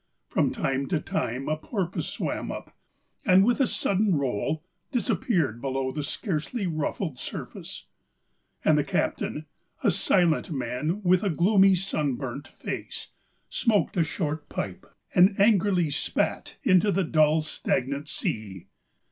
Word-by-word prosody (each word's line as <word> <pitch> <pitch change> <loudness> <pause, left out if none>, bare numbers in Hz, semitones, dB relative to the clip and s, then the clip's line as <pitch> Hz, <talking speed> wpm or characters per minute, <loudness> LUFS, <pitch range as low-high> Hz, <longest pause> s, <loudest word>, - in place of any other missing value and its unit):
From - - +2
time 135 0 -1
to 170 - +1
time 135 - -2
a 155 - +1
porpoise 185 +2 -3
swam - - -3
up, - - -8 0.5
and 190 0 +6
with 245 +4 +2
a 265 - +4
sudden 200 -3 +1
roll 140 +3 -1 0.3
disappeared 180 - 0
below 135 -1 -1
the 150 +2 -3
scarcely 190 - -2
ruffled 155 -2 -2
surface. - - -7 0.8
And - - +5
the - - +2
captain, 155 - -1 0.4
a 210 - +5
silent 175 0 +2
man 145 - -2
with 185 +1 +4
a 200 - +2
gloomy, 190 +3 +5
sunburnt 145 -7 -2
face, - - -6 0.4
smoked 220 -5 +1
a 175 - +3
short 155 -2 -3
pipe - - -5 0.3
and 190 +3 +5
angrily 195 -6 +4
spat - - -1
into 185 +3 +4
the 195 0 +1
dull, 155 -1 +3
stagnant 140 -1 -1
sea. 100 -9 -3
165 Hz, 130 wpm, -27 LUFS, 140-195 Hz, 0.8 s, and